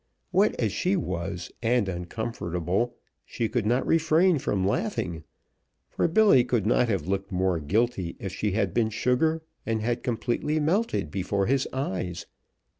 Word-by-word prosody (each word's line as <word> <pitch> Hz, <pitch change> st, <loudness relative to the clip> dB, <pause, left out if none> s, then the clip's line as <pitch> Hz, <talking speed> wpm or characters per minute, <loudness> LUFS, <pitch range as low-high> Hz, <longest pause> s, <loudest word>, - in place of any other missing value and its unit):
Wet 195 Hz, +3 st, +2 dB
as 110 Hz, -4 st, +1 dB
she 185 Hz, -, +1 dB
was, 90 Hz, -, -3 dB
and 120 Hz, -2 st, +2 dB
uncomfortable, 90 Hz, +2 st, -2 dB, 0.3 s
she 115 Hz, -, -2 dB
could 115 Hz, -1 st, -1 dB
not 125 Hz, +3 st, +2 dB
refrain 165 Hz, +1 st, +3 dB
from 95 Hz, -6 st, 0 dB
laughing, 100 Hz, -, -1 dB, 0.7 s
for -, -, +1 dB
Billy 170 Hz, -, +5 dB
could 120 Hz, -4 st, 0 dB
not 120 Hz, +2 st, +3 dB
have 95 Hz, -8 st, 0 dB
looked 100 Hz, +1 st, -2 dB
more 90 Hz, -2 st, +1 dB
guilty 95 Hz, +2 st, 0 dB
if 95 Hz, -1 st, -5 dB
she 105 Hz, 0 st, -1 dB
had 110 Hz, -, 0 dB
been 115 Hz, -2 st, +2 dB
sugar 155 Hz, +9 st, +1 dB, 0.2 s
and 110 Hz, -1 st, -1 dB
had 120 Hz, +1 st, -1 dB
completely 125 Hz, +6 st, -1 dB
melted 170 Hz, -, 0 dB
before 100 Hz, +1 st, -1 dB
his 135 Hz, +3 st, +1 dB
eyes. 95 Hz, -9 st, -3 dB
115 Hz, 150 wpm, -26 LUFS, 95-135 Hz, 0.7 s, Billy